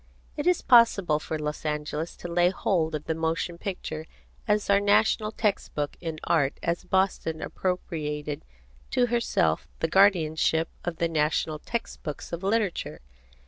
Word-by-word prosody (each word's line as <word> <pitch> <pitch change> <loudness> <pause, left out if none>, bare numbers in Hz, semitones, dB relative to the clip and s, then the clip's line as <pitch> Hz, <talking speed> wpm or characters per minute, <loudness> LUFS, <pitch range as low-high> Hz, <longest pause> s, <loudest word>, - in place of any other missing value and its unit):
It 295 +2 -2
is 360 -1 +3
possible 200 -10 +5
for 155 +1 -4
Los 150 -1 -4
Angeles 150 +1 -3
to - - -7
lay 175 +1 +3
hold 170 -4 0
of 150 - -4
the 160 - 0
motion 165 +1 -2
picture 160 -5 -5 0.4
as 210 -1 +2
our 200 0 +5
national 215 +1 +3
text 210 -2 -1
book 145 -1 -2
in 165 -2 -4
Art 145 -4 +1
as 170 +2 -1
Boston 185 -4 0
appropriated 150 -6 -3 0.5
to 245 - +3
herself 80 - +1
the 165 - +1
guardianship 165 -3 +3
of 175 -1 -3
the 170 - +1
national 155 -1 0
text 235 +8 -4
books 150 +2 -6
of 170 - -3
Literature. 200 -1 -1
170 Hz, 150 wpm, -27 LUFS, 155-195 Hz, 0.5 s, possible